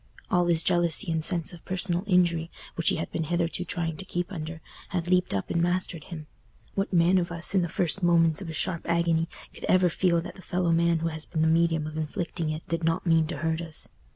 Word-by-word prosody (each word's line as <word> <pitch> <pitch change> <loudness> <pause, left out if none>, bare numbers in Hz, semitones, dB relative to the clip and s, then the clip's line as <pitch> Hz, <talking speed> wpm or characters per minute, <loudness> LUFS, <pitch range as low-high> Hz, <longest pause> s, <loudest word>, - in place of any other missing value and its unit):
All 175 -3 +3
his 170 -1 +2
jealousy 175 +1 +2
and 160 -1 0
sense 175 +1 +3
of 170 - -12
personal 185 -1 -1
injury, 170 -3 +2 0.2
which 170 - +2
he - - +2
had 160 - -4
been 160 - -2
hitherto 170 +2 -1
trying 165 -4 -3
to 195 - -6
keep 175 0 -3
under, 160 -2 -6 0.3
had 175 -1 -2
leaped 180 0 +2
up 95 - -2
and 170 - +1
mastered 175 -2 -1
him. 165 -5 -8 0.5
What 195 0 -1
man 180 +1 +4
of 175 -1 -3
us, 170 +2 0
in 190 - +4
the 175 - -1
first 175 +3 0
moments 165 -1 +3
of 180 - -6
a - - -5
sharp 170 +2 -1
agony, 170 -1 +2 0.2
could - - -12
ever 185 -1 +4
feel 170 0 +2
that 175 +1 -8
the 190 - -13
fellow 180 -1 0
man 170 0 +3
who 165 - 0
has 155 -1 -5
been 160 -2 -1
the - - +3
medium 165 -1 +2
of 155 0 -6
inflicting 160 +1 -3
it 155 +1 -5
did 165 0 -2
not 165 +3 0
mean 165 -2 +3
to - - -4
hurt 160 0 -1
us? 160 -2 -2
170 Hz, 235 wpm, -27 LUFS, 160-180 Hz, 0.5 s, man